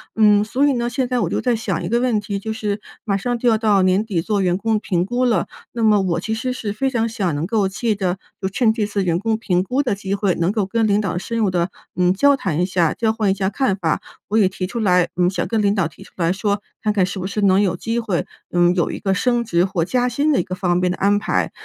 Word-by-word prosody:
嗯， 210 -2 +5
所 265 +6 +1
以 285 - +4
呢， 240 -1 -1
现 255 +2 -1
在 250 0 0
我 - - 0
就 - - -1
在 245 -2 +1
想 225 - -3
一 - - -3
个 235 +1 +2
问 245 -4 +1
题， 200 -1 -4
就 220 +2 -4
是 210 -1 -3 0.2
马 200 -3 0
上 245 +4 -2
就 240 +1 +2
要 220 - +3
到 210 -3 +3
年 185 +3 +2
底 185 -7 -1
做 205 +1 0
员 180 -1 +1
工 220 0 0
评 180 -4 -1
估 245 +4 0
了， 225 -8 +1 0.3
那 235 - -2
么 210 -2 +5
我 170 -3 0
其 220 - -3
实 250 +3 -2
是 215 -5 -4
非 270 +5 0
常 230 -3 0
想 190 -9 -1
能 150 +3 -2
够 205 -1 +1
借 220 +3 -1
得 190 -2 -1 0.2
就 190 - 0
趁 220 +3 +2
这 215 -2 -1
次 200 -1 -1
员 170 -1 +1
工 220 +2 0
评 180 -6 0
估 255 +8 0
的 245 -6 0
机 200 0 -3
会， 200 -2 +1
能 170 +3 +1
够 210 -4 0
跟 225 +2 0
领 205 +1 +2
导 180 -4 -2
深 230 +5 -4
入 205 -4 +2
地 175 0 0 0.3
嗯 180 0 +3
交 280 +8 +4
谈 175 - -1
一 180 - +3
下， 180 -4 +1
交 225 -1 +1
换 215 -3 0
一 - - +3
下 190 0 -1
看 260 -4 0
法。 165 -5 -1 0.3
我 215 - +1
也 195 -4 +4
提 185 -1 -4
出 235 +5 -4
来 180 -4 +3
嗯 180 0 +2
想 185 -2 -2
跟 225 -2 0
领 200 0 +2
导 190 -6 +1
提 - - -16
出 - - -18
来 170 -1 +1
说， 200 +1 -1 0.2
看 215 -1 +1
看 195 -3 +2
是 190 +1 -5
不 185 - -3
是 210 +1 -3
能 195 0 +4
有 185 -4 +1
机 230 +6 -2
会， 205 -7 -1 0.3
嗯 175 0 +3
有 175 - 0
一 - - -5
个 195 -1 0
升 240 +4 +1
职 175 -6 +1
或 185 -4 0
加 250 +3 +1
薪 285 +6 +1
的 - - +2
一 175 - +1
个 185 - -5
方 180 -3 0
面 180 0 +1
的 - - -4
安 200 +1 +2
排。 205 - -1
205 Hz, 310 characters per minute, -20 LUFS, 185-225 Hz, 0.3 s, 嗯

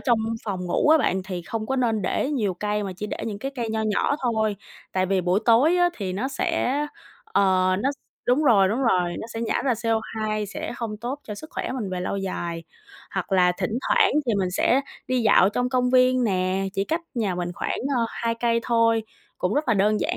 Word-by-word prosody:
trong 240 -4 +2 0.3
phòng 195 -4 -3
ngủ 175 - +1
á 315 +1 +7
bạn, 190 -9 +1
thì 185 -2 -5
không 220 +5 -4
có 265 - -1
nên 225 -5 +1
để 265 - 0
nhiều 215 -10 0
cây 210 +3 -2
mà 195 -2 -4
chỉ 210 +2 -4
để - - -5
những 210 -3 -4
cái 270 +6 -4
cây 235 -3 -3
nho 220 0 -1
nhỏ 215 +6 +1
thôi, 220 -4 +1 0.4
tại 185 0 +1
vì 190 0 +1
buổi 180 +3 +1
tối 260 +9 +5
á 355 0 +4
thì 190 -3 -3
nó 225 +8 -2
sẽ, 330 -3 0 0.5
ờ, 185 - +2
nó 270 - +1
s - - -16 0.3
đúng 255 +5 +3
rồi, 200 -8 +5
đúng 225 +6 -1
rồi, 180 -7 +2
nó - - -6
sẽ 225 - -3
nhả 230 - 0
ra 265 - +3
CO2, 220 -1 -1
sẽ 200 - -5
không 225 -3 -4
tốt 245 +6 -4
cho 210 - -6
sức 310 +10 -10
khỏe - - -3
mình 230 -7 -4
về 180 -1 -3
lâu 180 - -2
dài. 170 -3 -4 0.5
Hoặc - - -4
là 180 -1 +4
thỉnh 210 +5 -1
thoảng 475 -5 +4 0.2
thì 235 - +2
mình 185 -2 0
sẽ 240 +8 +2 0.3
đi 255 -1 +1
dạo 200 -3 +5
trong 245 +4 -1
công 250 -1 +1
viên 255 0 +4
nè, 185 -2 0
chỉ 195 -1 -1
cách 325 +9 -1
nhà 215 -6 0
mình 175 0 -3
khoảng, - - -2 0.2
ờ, 235 - +2
2 230 0 -2
cây 230 0 +1
thôi, 230 -1 +2 0.4
cũng 180 - 0
rất 295 -1 0
là 230 - +4
đơn 210 +1 +2
giản - - -1
220 Hz, 230 wpm, -24 LUFS, 190-250 Hz, 0.5 s, á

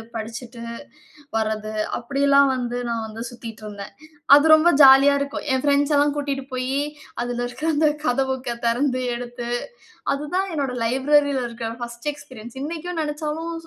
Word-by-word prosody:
படிச்சிட்டு, 230 +2 -7 0.8
வர்றது 215 0 -2 0.2
அப்படியெல்லாம் 280 +2 +3
வந்து 245 -1 -3
நான் 230 -1 -2
வந்து 220 +1 -8
சுத்திட்டு 230 -2 -10
இருந்தேன். 205 -1 -8 0.4
அது 290 - +5
ரொம்ப 315 +2 +4
ஜாலியா 275 +1 +8
இருக்கும். 280 0 -4
என் 260 - 0
ஃபிரெண்ட்ஸ் 285 +1 +2
எல்லாம் 290 0 +3
கூட்டிட்டுப் 275 -1 -3
போயி 260 +2 -1 0.4
அதில 245 0 -2
இருக்க 245 +4 -10
அந்த 305 +1 +3 0.2
கத 245 +2 +2
புக்க 255 -2 -3
திறந்து 255 +2 +1
எடுத்து, 240 0 -6 0.6
அதுதான் 300 +7 -2
என்னுடைய 275 -5 -2
லைப்ரரில 280 +2 +2
இருக்க 230 -1 -6
1 235 +3 -7
எக்ஸ்பீரியன்ஸ். 260 -5 -12
இன்னக்கும் 330 +3 -4
நினச்சாலும் 305 +2 -4
265 Hz, 140 wpm, -22 LUFS, 235-290 Hz, 0.8 s, ஜாலியா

